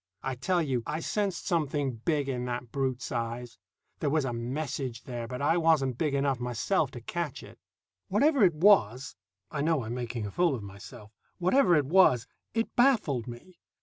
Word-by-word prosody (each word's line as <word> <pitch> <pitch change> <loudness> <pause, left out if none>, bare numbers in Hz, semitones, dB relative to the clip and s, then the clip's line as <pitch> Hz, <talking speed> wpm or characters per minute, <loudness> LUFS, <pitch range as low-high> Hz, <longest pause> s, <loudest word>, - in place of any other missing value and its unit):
I 135 - -2
tell 175 +7 0
you 130 -5 -1
I 155 +2 -2
sensed 195 +1 -2
something 145 - 0
big 145 +4 -1
in 125 -2 -2
that 120 -1 -4
brute's 135 -2 -2
eyes; 120 -1 -4 0.4
there 150 - 0
was 150 -1 +1
a 120 - -2
message 125 0 -4
there, 120 -2 -5
but 125 +3 -5
I 165 +4 +3
wasn't 150 -7 +2
big 150 -3 0
enough 140 -2 +1
myself 125 - 0
to 120 - -8
catch 170 +3 -4
it. - - -14 0.5
Whatever 275 +5 +3
it 175 -5 +4
was 135 - +3 0.4
(I 145 - -2
know 155 -3 +1
I'm 110 +2 -5
making 120 -2 -4
a 100 - -5
fool 170 - +2
of 110 - -7
myself) 105 +2 -11 0.3
whatever 185 +1 +4
it 150 -3 +2
was, 135 -7 +4 0.3
it 225 0 -1
baffled 215 - +2
me. 145 +9 -11
135 Hz, 180 wpm, -29 LUFS, 120-165 Hz, 0.5 s, it